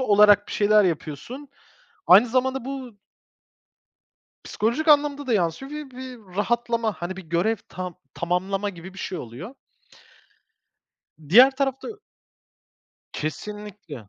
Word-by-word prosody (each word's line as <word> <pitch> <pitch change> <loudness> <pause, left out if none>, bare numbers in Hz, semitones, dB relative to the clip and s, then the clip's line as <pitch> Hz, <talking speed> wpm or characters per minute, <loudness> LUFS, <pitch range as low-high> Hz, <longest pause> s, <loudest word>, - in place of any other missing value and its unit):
olarak 205 -3 +5
bir - - -6
şeyler 210 0 +4
yapıyorsun. 180 - -4 0.6
Aynı 200 +7 +8
zamanda 260 +1 0
bu 260 -5 -7 1.5
psikolojik 240 +9 -1
anlamda 290 -1 +3
da 245 - 0
yansıyor 205 - -1
ve 300 -3 -7
bir 245 -7 -11
rahatlama, 230 +1 0
hani 180 +1 -6
bir 190 - -8
görev 175 +8 0
ta 180 -1 -6 0.2
tamamlama 190 +4 -1
gibi 185 +1 -11
bir - - -11
şey 185 -2 -4
oluyor. 145 - -9 1.7
Diğer 245 +9 +8
tarafta, 270 - -2
ö 435 - -8 1.2
Kesinlikle. 175 - -7
210 Hz, 115 wpm, -24 LUFS, 180-260 Hz, 1.7 s, Aynı